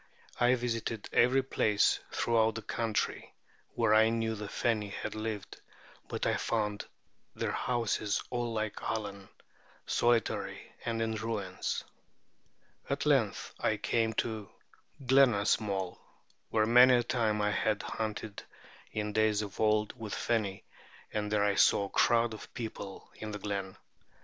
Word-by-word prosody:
I 125 Hz, +1 st, +5 dB
visited 115 Hz, -3 st, -3 dB
every 130 Hz, +3 st, +4 dB
place 105 Hz, -5 st, +2 dB
throughout 110 Hz, -2 st, +2 dB
the 115 Hz, -, -5 dB
country 115 Hz, 0 st, -2 dB, 0.4 s
where 115 Hz, -2 st, +3 dB
I 110 Hz, +1 st, +6 dB
knew 115 Hz, -1 st, 0 dB
the 105 Hz, -1 st, -5 dB
Feni 105 Hz, -1 st, 0 dB
had 100 Hz, -, -5 dB
lived; 110 Hz, -2 st, -5 dB, 0.5 s
but -, -, -3 dB
I -, -, +2 dB
found 105 Hz, -2 st, -1 dB, 0.5 s
their -, -, -1 dB
houses 115 Hz, -4 st, 0 dB
all 120 Hz, -1 st, -1 dB
like 110 Hz, -2 st, -3 dB
Allen, 100 Hz, -3 st, -4 dB, 0.6 s
solitary 120 Hz, -2 st, 0 dB
and 115 Hz, -1 st, -1 dB
in 110 Hz, 0 st, -1 dB
ruins. 105 Hz, -4 st, -3 dB, 1.1 s
At -, -, -1 dB
length -, -, +1 dB
I -, -, +1 dB
came 115 Hz, -1 st, 0 dB
to 110 Hz, -2 st, -2 dB, 0.6 s
Glenasmole,[B] 105 Hz, -7 st, +3 dB, 0.5 s
where 110 Hz, -1 st, +2 dB
many 125 Hz, +3 st, +7 dB
a 120 Hz, -, +3 dB
time 115 Hz, -3 st, 0 dB
I 105 Hz, 0 st, +2 dB
had 105 Hz, 0 st, 0 dB
hunted 110 Hz, -1 st, -4 dB, 0.5 s
in 105 Hz, -1 st, -3 dB
days 110 Hz, -1 st, +2 dB
of 100 Hz, -1 st, -8 dB
old 105 Hz, -1 st, +2 dB
with 110 Hz, -3 st, -5 dB
the -, -, -3 dB
Feni, 100 Hz, -4 st, -1 dB, 0.5 s
and 105 Hz, -1 st, -2 dB
there 105 Hz, -1 st, +3 dB
I 100 Hz, -1 st, +3 dB
saw 100 Hz, -, +4 dB
a -, -, -7 dB
crowd 115 Hz, +2 st, +3 dB
of 110 Hz, -, -10 dB
people 110 Hz, -4 st, -7 dB
in 110 Hz, -, -6 dB
the 105 Hz, -, -4 dB
glen. 100 Hz, -2 st, -4 dB
110 Hz, 140 wpm, -31 LUFS, 105-115 Hz, 1.1 s, many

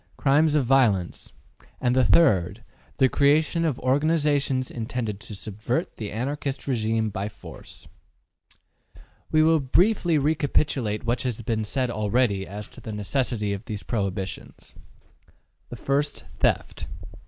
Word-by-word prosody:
Crimes 150 Hz, +2 st, +3 dB
of 145 Hz, -4 st, +2 dB
violence. 115 Hz, -9 st, +2 dB, 0.5 s
3. 125 Hz, -, +1 dB
The 115 Hz, -, +2 dB
creation 155 Hz, +4 st, +3 dB
of 155 Hz, -7 st, 0 dB
organizations 140 Hz, -1 st, +1 dB
intended 115 Hz, -3 st, -4 dB
to 105 Hz, -, -7 dB
subvert 110 Hz, -, -3 dB
the 105 Hz, -2 st, -5 dB
Anarchist 135 Hz, +5 st, -3 dB
regime 110 Hz, -3 st, 0 dB
by 100 Hz, +2 st, -3 dB
force. 105 Hz, -, -12 dB, 1.4 s
We 155 Hz, 0 st, +4 dB
will 160 Hz, 0 st, +4 dB
briefly 175 Hz, -, +2 dB
recapitulate 145 Hz, -6 st, 0 dB
what 120 Hz, +1 st, 0 dB
has 120 Hz, -3 st, -3 dB
been 110 Hz, 0 st, -1 dB
said 125 Hz, +3 st, -1 dB
already 105 Hz, -2 st, 0 dB
as 105 Hz, +2 st, -7 dB
to -, -, -13 dB
the 110 Hz, -, -7 dB
necessity 105 Hz, 0 st, -1 dB
of 100 Hz, +3 st, -6 dB
these 105 Hz, -3 st, -5 dB
prohibitions. 100 Hz, -4 st, -4 dB, 1.0 s
1. 140 Hz, +1 st, 0 dB, 0.4 s
Theft. -, -, 0 dB
125 Hz, 120 wpm, -25 LUFS, 105-145 Hz, 1.4 s, We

